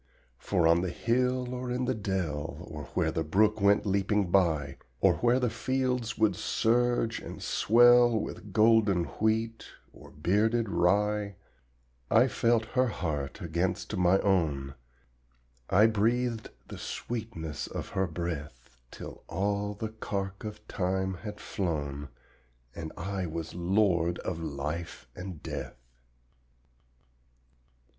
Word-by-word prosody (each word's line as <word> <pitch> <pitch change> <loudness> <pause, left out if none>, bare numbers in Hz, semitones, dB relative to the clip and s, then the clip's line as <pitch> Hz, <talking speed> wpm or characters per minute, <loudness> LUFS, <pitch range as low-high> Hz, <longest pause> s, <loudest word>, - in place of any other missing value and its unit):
For 90 -5 +2
on 85 +1 +5
the 90 - -1
hill 125 +5 0
or 125 0 -4
in 125 +1 -1
the 130 - +1
dell, 85 - -3
Or 75 -3 -6
where - - +2
the 80 - -1
brook 105 +6 +2
went 100 +2 +4
leaping 100 -1 +1
by 80 -7 +2 0.2
Or - - +4
where 120 +1 +3
the 125 -3 0
fields 125 0 -1
would 110 -1 +3
surge 120 0 +1
and - - -8
swell 120 0 +5
With 105 - -6
golden 105 -3 +4 0.2
wheat 110 +1 0 0.3
or - - -14
bearded 105 +8 +1
rye, 100 +2 +1 0.7
I - - +5
felt 115 -1 +2
her 130 0 +3
heart 75 - -3
against 85 +5 -2
my 90 0 +4
own, 75 -9 +1 1.0
I 105 +3 +6
breathed 115 +1 +1 0.2
the - - -8
sweetness 110 -10 -5
of - - -6
her 95 0 0
breath, 75 -7 -6
Till - - -10
all 100 +3 -1
the 110 +2 -4
cark 100 -3 -4
of 105 0 -8
time 95 0 -1
had 105 +3 -7
flown, 75 -6 -3 0.6
And 80 -2 -6
I 95 +1 -3
was 80 0 -5
lord 90 -1 +2
of 85 -3 -2
life 75 0 -4
and 90 -4 -8
death. - - -5
100 Hz, 125 wpm, -29 LUFS, 85-110 Hz, 1.0 s, I